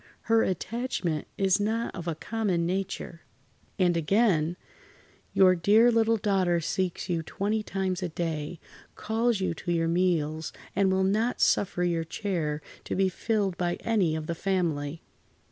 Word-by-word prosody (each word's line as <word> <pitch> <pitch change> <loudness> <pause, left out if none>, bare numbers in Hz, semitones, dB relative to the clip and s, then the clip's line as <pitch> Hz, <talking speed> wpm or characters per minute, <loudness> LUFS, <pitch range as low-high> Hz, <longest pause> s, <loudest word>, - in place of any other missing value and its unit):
Her 225 0 +3
attachment 190 - -2
is 195 0 +3
not 220 +3 -1
of 175 -2 -7
a 165 - -1
common 190 -2 -1
nature." 185 -2 -3 0.6
And 180 -3 +3
again: 170 -1 +2 0.7
"Your 185 -1 +6
dear 210 +8 +5
little 225 0 +3
daughter 190 -4 +1
seeks 180 +2 -2
you 170 -2 0
twenty 205 +6 -2
times 190 -2 -2
a 180 - -2
day, 160 -1 -3 0.4
calls 225 -1 0
you 185 - 0
to 175 +2 -4
your 165 -1 +1
meals, 165 -3 0 0.2
and 195 -1 +3
will 190 0 +2
not 215 +6 +1
suffer 180 -2 +2
your 170 -2 +1
chair 160 -4 -3 0.2
to - - -3
be 190 0 +2
filled 200 -1 -1
by 175 -1 0
any 195 -9 +1
of 160 -1 -4
the 170 - -2
family." 165 -4 -1
185 Hz, 150 wpm, -28 LUFS, 165-205 Hz, 0.7 s, Your